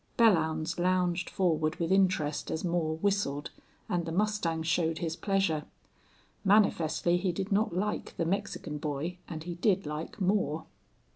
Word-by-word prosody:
Belllounds 165 -6 +3
lounged 180 0 +1
forward 160 -4 +1
with 165 +1 -2
interest 185 -6 +2
as 160 - -2
Moore 170 -3 0
whistled, 180 -7 0 0.4
and 175 -1 0
the - - -2
mustang 180 -4 0
showed 165 0 +1
his 165 -1 -2
pleasure. 195 -7 0 0.8
Manifestly 175 -5 +3
he 180 0 0
did 190 +4 -4
not 200 -3 +1
like 210 +2 -2
the 165 - 0
Mexican 175 -4 -2
boy 155 +4 -3
and 160 -2 -5
he 175 +1 -4
did 190 +2 +1
like 150 +7 -5
Moore. 185 -5 +1
175 Hz, 145 wpm, -30 LUFS, 160-195 Hz, 0.8 s, Belllounds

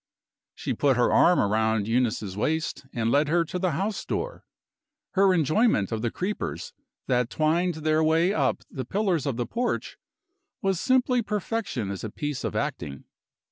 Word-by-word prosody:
She - - -3
put 135 -3 +2
her 120 - +3
arm 180 - +5
round 110 0 +1
Eunice's 110 -5 0
waist 155 +4 -2
and 115 -1 0
led 145 +3 +3
her 170 +2 +2
to 180 - -4
the 180 -3 0
house 195 +7 -2
door. - - -4 0.7
Her 195 0 +4
enjoyment 165 - +2
of 110 -1 -2
the 120 - 0
creepers 190 - -4 0.3
that 125 -1 +1
twined 165 +3 +1
their 155 0 +3
way 165 +4 +3
up 140 -7 0
the 130 - -4
pillars 180 - 0
of 130 -4 -1
the 120 - -1
porch 240 - -3 0.6
was 195 -3 0
simply 255 0 +2
perfection 210 - -2
as 100 - -6
a 110 - -3
piece 145 +4 -4
of - - -3
acting. 85 - -3
155 Hz, 165 wpm, -26 LUFS, 120-190 Hz, 0.7 s, arm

